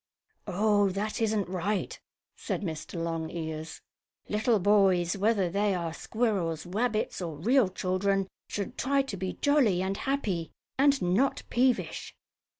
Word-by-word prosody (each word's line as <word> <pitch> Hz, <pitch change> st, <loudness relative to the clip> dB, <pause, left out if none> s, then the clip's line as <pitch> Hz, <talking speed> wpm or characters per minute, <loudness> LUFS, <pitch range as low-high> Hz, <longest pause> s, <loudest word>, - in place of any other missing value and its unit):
"Oh, 205 Hz, +1 st, +3 dB
that 205 Hz, +4 st, -3 dB
isn't 215 Hz, -3 st, +1 dB
right," 190 Hz, +2 st, -2 dB, 0.4 s
said -, -, -3 dB
Mr. 160 Hz, -1 st, -5 dB
Longears. 160 Hz, -1 st, -4 dB, 0.5 s
"Little 220 Hz, +2 st, +2 dB
boys, 190 Hz, -3 st, +3 dB
whether 200 Hz, -1 st, +2 dB
they 200 Hz, +2 st, +1 dB
are 170 Hz, -2 st, -3 dB
squirrels, 185 Hz, -8 st, -1 dB
rabbits 215 Hz, +3 st, -1 dB
or 165 Hz, -4 st, -4 dB
real 235 Hz, -, +3 dB
children, 190 Hz, +1 st, 0 dB, 0.2 s
should 205 Hz, +4 st, -4 dB
try 275 Hz, 0 st, +2 dB
to 270 Hz, -7 st, -5 dB
be 185 Hz, 0 st, -3 dB
jolly 245 Hz, -11 st, +3 dB
and 195 Hz, +1 st, -2 dB
happy, 210 Hz, -, -1 dB, 0.3 s
and 275 Hz, 0 st, +4 dB
not 195 Hz, +10 st, +2 dB
peevish." 250 Hz, 0 st, 0 dB
195 Hz, 130 wpm, -29 LUFS, 175-220 Hz, 0.5 s, and